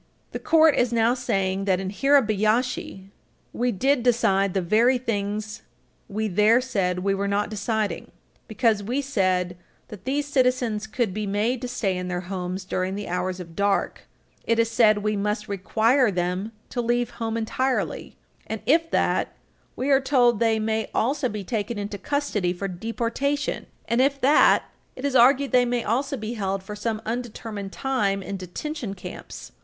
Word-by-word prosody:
The - - -4
Court 320 -2 +5
is 245 -1 +2
now 230 0 +3
saying 195 -6 -1
that, 185 -2 +2
in 190 0 -4
Hirabayashi, 220 -5 +1 0.4
we 245 +1 0
did 260 +6 +1
decide 200 -6 +2
the 190 - +2
very 230 +8 +3
things 215 -2 -3 0.5
we 215 +2 -2
there 210 +4 +4
said 195 -8 -1
we 195 0 +2
were 200 +1 -1
not 205 +1 0
deciding. 210 -3 -2 0.4
Because 220 -2 +1
we 240 +7 -2
said 185 -9 0 0.3
that 210 +1 -11
these 285 +2 0
citizens 250 -6 +1
could 220 -2 -1
be 210 +1 -3
made 220 +5 0
to 250 - -3
stay 215 -6 -1
in 180 0 -4
their 180 0 -2
homes 185 0 -5
during 185 0 -2
the 205 0 -5
hours 180 +1 -2
of 170 -2 -9
dark, 200 0 0 0.4
it 230 - +1
is 230 0 +2
said 215 -3 +4
we 210 0 0
must 210 +2 -2
require 220 +6 +2
them 180 +3 -2 0.2
to 245 - -1
leave 240 0 0
home 225 0 -1
entirely, 255 +4 -2 0.3
and 220 -1 -4
if 330 +4 +3
that, - - +1 0.4
we 270 +3 -1
are 270 0 +5
told 245 -5 +3
they 225 -1 +3
may 220 0 -1
also 260 +2 +1
be 210 -2 -5
taken 220 +2 -3
into 205 0 -5
custody 220 -9 -1
for 195 +2 -4
deportation, 230 +9 -2 0.2
and, 235 +2 +2
if 275 +1 +2
that, 280 +3 +5 0.3
it 260 - -6
is 280 -2 -1
argued, 265 +3 +5
they 250 -1 +5
may 245 -1 -1
also 275 +5 -1
be 220 0 -4
held 195 -3 -2
for 210 +2 -7
some 215 +1 -3
undetermined 225 -4 -5
time 205 -8 -1
in 200 - -5
detention 200 - -5
camps. 180 - -9
220 Hz, 170 wpm, -24 LUFS, 195-250 Hz, 0.5 s, Court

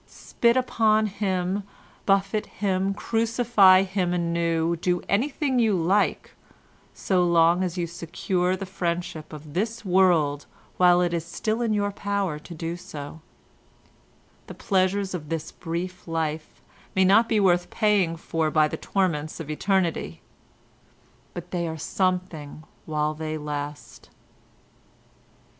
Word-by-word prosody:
Spit 235 +1 0
upon 220 -4 +2
him, 190 -1 -1 0.5
buffet 195 +2 +1
him, 195 -1 -1
crucify 225 -2 +4
him 185 -2 -1
anew, 170 -1 0
do 175 +1 -1
anything 265 +4 0
you 220 -4 +3
like 185 +4 +1 0.6
so 185 -2 0
long 170 0 +4
as 180 -1 -3
you 175 - 0
secure 175 +2 -2
the 195 - -6
friendship 175 -4 -4
of 150 -1 -10
this 225 +5 -2
world 175 -6 +3 0.3
while 180 -1 +5
it 175 -1 0
is 170 -2 -1
still 215 +6 -2
in 230 -2 0
your 205 -1 0
power 200 -6 -2
to 170 +3 -11
do 165 +1 -4
so; 155 -2 -9 1.3
the - - -9
pleasures 190 0 0
of 155 -5 -6
this 165 -1 -4
brief 180 +2 -5
life 160 -1 -3 0.3
may 190 0 +4
not 220 +5 +5
be 220 - +3
worth 175 -3 +2
paying 205 -6 +2
for 160 -1 -1
by 155 0 +3
the - - -5
torments 165 -6 -1
of 155 -2 -5
eternity, 165 - -1 1.2
but - - -8
they 170 -1 -1
are 160 0 -4
something 180 -3 -2 0.2
while 150 -1 0
they 155 0 -4
last. 145 -1 -6
180 Hz, 130 wpm, -25 LUFS, 165-200 Hz, 1.3 s, while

